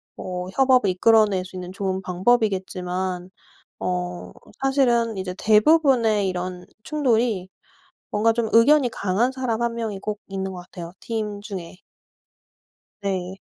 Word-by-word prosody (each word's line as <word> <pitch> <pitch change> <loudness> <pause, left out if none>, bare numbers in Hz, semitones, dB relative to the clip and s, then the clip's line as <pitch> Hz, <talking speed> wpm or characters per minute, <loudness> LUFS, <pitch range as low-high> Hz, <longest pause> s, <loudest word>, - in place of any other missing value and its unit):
뭐 180 0 -5
협업을 255 -6 +4
이끌어낼 205 0 +4
수 185 - -12
있는 180 0 -6
좋은 190 0 -2
방법이겠지만 185 -3 -1 0.5
어 180 -1 -3 0.3
사실은 240 -5 +2
이제 185 -1 -4
대부분의 220 -3 +4
이런 180 0 -4 0.2
충돌이 235 -10 +1 0.6
뭔가 220 +2 +3
좀 230 -1 -1
의견이 255 +3 +5
강한 220 +4 0
사람 250 -4 -2
1 235 -1 0
명이 220 -4 -4
꼭 210 -1 -4
있는 190 -1 -4
것 180 - -7
같아요, 170 -1 -9
팀 215 -3 -4
중에. 190 -4 -7 1.2
네. 190 -1 -3
205 Hz, 255 characters per minute, -23 LUFS, 185-230 Hz, 1.2 s, 의견이